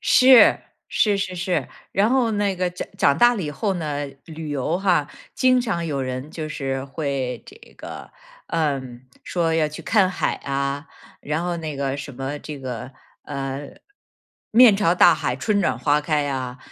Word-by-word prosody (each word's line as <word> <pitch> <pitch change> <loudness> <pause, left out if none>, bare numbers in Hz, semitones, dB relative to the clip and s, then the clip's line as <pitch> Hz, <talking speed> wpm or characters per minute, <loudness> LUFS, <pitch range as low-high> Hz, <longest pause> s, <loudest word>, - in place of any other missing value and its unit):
是， 255 -1 +7 0.3
是 205 -2 +2
是 185 -2 -3
是， 180 +1 -1 0.2
然 205 +4 +2
后 250 -4 +2
那 205 -2 0
个 180 0 0
长 180 - -6
长 140 - +4
大 240 0 +6
了 200 - -3
以 150 - -3
后 195 +7 -1
呢， 150 -4 -3 0.2
旅 160 -2 -8
游 145 +5 -1
哈， 180 -7 +2 0.3
经 255 -1 +4
常 170 -9 -2
有 140 -3 -2
人 130 +3 -5
就 155 -2 -5
是 135 -2 -3
会 135 -3 -3
这 400 - -13 0.2
个 - - -9 0.4
呃， 150 -5 0 0.4
说 165 -2 0
要 155 -2 +2
去 150 - -9
看 195 -4 +3
海 180 - -1
啊， 140 +1 -2 0.3
然 155 +3 -2
后 175 -1 -1
那 155 -3 -5
个 135 0 -2
什 140 0 -7
么 135 +3 -4
这 150 -2 -7
个， 125 -2 -6 0.3
呃， 140 0 -5 0.8
面 230 -2 +7
朝 175 -4 +2
大 175 -1 +6
海、 - - -2
春 205 +7 0
暖 175 - 0
花 145 0 +2
开 150 -1 0
啊， 130 -2 -4
155 Hz, 185 characters per minute, -22 LUFS, 140-185 Hz, 0.8 s, 是